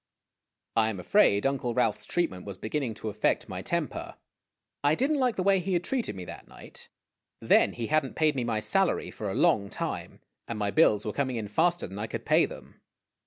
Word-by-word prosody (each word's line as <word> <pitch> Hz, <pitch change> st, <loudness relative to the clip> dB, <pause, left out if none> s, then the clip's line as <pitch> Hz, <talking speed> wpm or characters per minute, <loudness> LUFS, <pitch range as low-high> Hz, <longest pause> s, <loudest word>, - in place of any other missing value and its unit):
I 110 Hz, -1 st, +3 dB
am 100 Hz, -4 st, -5 dB
afraid 100 Hz, -, +3 dB
Uncle 130 Hz, -3 st, 0 dB
Ralph's 115 Hz, -4 st, 0 dB
treatment 95 Hz, -, -1 dB
was 100 Hz, -2 st, -7 dB
beginning 120 Hz, +1 st, -3 dB
to 110 Hz, -, -5 dB
affect 105 Hz, +1 st, 0 dB
my -, -, -5 dB
temper. -, -, -3 dB, 0.7 s
I 145 Hz, +2 st, +4 dB
did 270 Hz, -, +1 dB
n't 300 Hz, -, +1 dB
like 250 Hz, -3 st, +2 dB
the 185 Hz, -, -1 dB
way 195 Hz, 0 st, +4 dB
he 185 Hz, +1 st, -2 dB
had 175 Hz, 0 st, +1 dB
treated 245 Hz, -, -1 dB
me 90 Hz, -1 st, -7 dB
that -, -, -10 dB
night. -, -, -11 dB, 0.5 s
Then -, -, +4 dB
he 115 Hz, -, -4 dB
had 155 Hz, +4 st, +2 dB
n't 135 Hz, -, -8 dB
paid 155 Hz, -2 st, +2 dB
me 130 Hz, -, -1 dB
my 115 Hz, -2 st, -1 dB
salary 180 Hz, -, +1 dB
for 105 Hz, -, -5 dB
a 95 Hz, -, -3 dB
long 100 Hz, -2 st, +3 dB
time, -, -, -5 dB, 0.3 s
and 115 Hz, -, -4 dB
my 105 Hz, -1 st, -1 dB
bills 105 Hz, -9 st, +4 dB
were 105 Hz, -, -2 dB
coming 130 Hz, -3 st, -1 dB
in 110 Hz, -3 st, -3 dB
faster 175 Hz, +11 st, +1 dB
than 95 Hz, +2 st, -8 dB
I 110 Hz, -, -3 dB
could -, -, -6 dB
pay -, -, +4 dB
them. -, -, -13 dB
120 Hz, 215 wpm, -28 LUFS, 105-170 Hz, 0.7 s, I